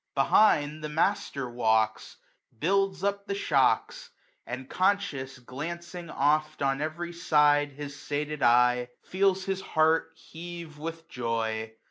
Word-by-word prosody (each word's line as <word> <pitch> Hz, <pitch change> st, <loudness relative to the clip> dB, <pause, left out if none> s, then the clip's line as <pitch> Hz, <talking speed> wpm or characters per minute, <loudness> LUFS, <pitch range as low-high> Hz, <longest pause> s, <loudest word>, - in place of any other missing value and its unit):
Behind 150 Hz, 0 st, +3 dB
the 150 Hz, -, -3 dB
master 150 Hz, -4 st, 0 dB
walks, 110 Hz, -2 st, 0 dB, 0.4 s
builds 195 Hz, -, +1 dB
up 200 Hz, 0 st, -1 dB
the 200 Hz, -, -2 dB
shocks; 460 Hz, -, +1 dB, 0.4 s
And, 130 Hz, 0 st, -6 dB
conscious, 185 Hz, -10 st, 0 dB
glancing 170 Hz, +7 st, -7 dB
oft 150 Hz, 0 st, +1 dB
on 135 Hz, +1 st, +1 dB
every 170 Hz, +3 st, -4 dB
side 145 Hz, -3 st, +3 dB
His 145 Hz, 0 st, -7 dB
sated 150 Hz, +1 st, -3 dB
eye, 125 Hz, +1 st, +4 dB
feels 190 Hz, 0 st, +1 dB
his 195 Hz, -1 st, -2 dB
heart 160 Hz, -1 st, +2 dB
heave 170 Hz, -2 st, -9 dB
with 165 Hz, +1 st, -6 dB
joy. 110 Hz, -2 st, -2 dB
150 Hz, 120 wpm, -28 LUFS, 135-175 Hz, 0.4 s, eye